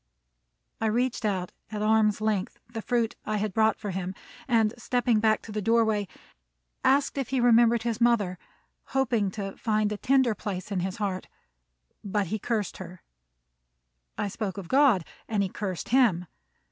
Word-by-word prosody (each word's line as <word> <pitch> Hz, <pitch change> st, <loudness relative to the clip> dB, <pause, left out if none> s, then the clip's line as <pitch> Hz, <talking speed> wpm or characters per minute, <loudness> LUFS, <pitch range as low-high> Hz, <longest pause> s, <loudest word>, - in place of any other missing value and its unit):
I 225 Hz, -, +2 dB
reached 240 Hz, +1 st, 0 dB
out, 185 Hz, -4 st, -1 dB, 0.2 s
at 210 Hz, -1 st, -3 dB
arm's 215 Hz, -1 st, +3 dB
length, 215 Hz, -3 st, -1 dB
the 230 Hz, -1 st, -6 dB
fruit 235 Hz, 0 st, 0 dB
I 215 Hz, 0 st, -1 dB
had 210 Hz, -1 st, -2 dB
brought 220 Hz, 0 st, +3 dB
for 205 Hz, -2 st, -5 dB
him, 185 Hz, 0 st, -4 dB, 0.3 s
and 225 Hz, -3 st, +3 dB
stepping 245 Hz, -1 st, +1 dB
back 215 Hz, 0 st, +2 dB
to 220 Hz, -, -9 dB
the 210 Hz, 0 st, -2 dB
doorway, 220 Hz, -2 st, +2 dB, 0.8 s
asked 275 Hz, +1 st, +2 dB
if 270 Hz, -, -3 dB
he 265 Hz, -1 st, 0 dB
remembered 235 Hz, -1 st, +5 dB
his 235 Hz, 0 st, -2 dB
mother, 210 Hz, -7 st, +2 dB, 0.6 s
hoping 235 Hz, -6 st, +2 dB
to 195 Hz, -2 st, -5 dB
find 215 Hz, -2 st, 0 dB
a 210 Hz, -, -2 dB
tender 260 Hz, 0 st, +3 dB
place 200 Hz, -1 st, -5 dB
in 195 Hz, -, 0 dB
his 185 Hz, +1 st, -2 dB
heart; 195 Hz, -3 st, -3 dB, 0.8 s
but 205 Hz, 0 st, 0 dB
he 215 Hz, -, -1 dB
cursed 215 Hz, -2 st, -2 dB
her. 185 Hz, -1 st, -10 dB, 1.1 s
I -, -, -1 dB
spoke 200 Hz, -1 st, -4 dB
of 195 Hz, -4 st, -6 dB
God, 260 Hz, -, +4 dB, 0.2 s
and 210 Hz, -3 st, +1 dB
he 190 Hz, -, -2 dB
cursed 190 Hz, -3 st, -4 dB
him. 225 Hz, -9 st, +3 dB
215 Hz, 165 wpm, -27 LUFS, 200-235 Hz, 1.1 s, remembered